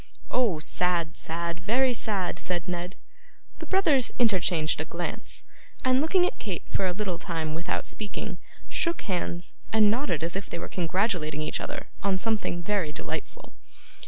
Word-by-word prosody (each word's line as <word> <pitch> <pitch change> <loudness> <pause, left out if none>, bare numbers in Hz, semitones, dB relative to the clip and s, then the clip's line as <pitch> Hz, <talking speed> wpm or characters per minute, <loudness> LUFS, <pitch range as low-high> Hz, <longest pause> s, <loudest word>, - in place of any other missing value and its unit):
'Oh! 235 -9 +3
sad, 170 +1 +2
sad; 170 +1 -2
very 245 +8 +3
sad!' 205 -6 0
said 175 -1 -2
Ned. 180 +1 -3 0.6
The 325 - -6
brothers 310 -10 +4
interchanged 180 -8 +3
a - - -3
glance, - - -3 0.4
and 255 +1 +5
looking 355 +4 +4
at - - -2
Kate 190 -6 -3
for 190 - +1
a - - +1
little 185 -2 -2
time 160 -3 -2
without 165 +2 -2
speaking, 205 -3 -4 0.3
shook 335 -1 0
hands, 175 -3 -2 0.2
and 215 -2 +6
nodded 225 - 0
as 170 +2 -1
if 195 0 -3
they - - -3
were - - -4
congratulating 175 -4 0
each - - -1
other - - -4 0.2
on 195 -1 +2
something 200 -4 0
very 195 -5 +1
delightful. - - -5
185 Hz, 160 wpm, -28 LUFS, 170-225 Hz, 0.6 s, and